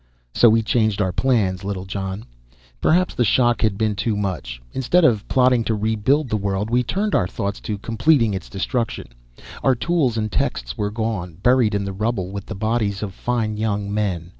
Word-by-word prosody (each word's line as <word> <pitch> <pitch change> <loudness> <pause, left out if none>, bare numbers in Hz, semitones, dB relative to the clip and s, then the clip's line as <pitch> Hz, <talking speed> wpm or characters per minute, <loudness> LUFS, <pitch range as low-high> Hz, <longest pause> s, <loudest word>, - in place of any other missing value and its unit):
"So 120 - +6
we 115 +1 +3
changed 110 -2 +1
our 95 -3 +1
plans, 100 -4 +1
Littlejohn. 95 +1 -4 0.6
Perhaps 180 +3 +3
the 120 - +1
shock 120 +1 +2
had 110 -3 +1
been 110 -1 +1
too 105 +2 -1
much. 90 -12 -3
Instead 165 +7 +3
of 110 -7 +2
plotting 125 -2 +3
to 110 - 0
rebuild 110 +7 +1
the 110 - 0
world, 100 +2 -2
we 125 +1 +3
turned 195 - -2
our 90 - +2
thoughts 100 +1 -4
to 105 - -4
completing 115 +2 +2
its 95 -2 -5
destruction. 115 +5 -3 0.5
Our 135 -1 +3
tools 135 -4 0
and 110 -1 -2
texts - - -2
were 105 -1 -1
gone, 105 -6 -3
buried 125 -4 +4
in 100 -1 -1
the 100 - -4
rubble 100 -2 -2
with 100 0 -6
the 110 - -5
bodies 110 -1 -1
of 100 -3 -5
fine 110 -1 -2
young 105 -2 -2
men. 95 -6 -2
110 Hz, 190 wpm, -21 LUFS, 100-120 Hz, 0.6 s, So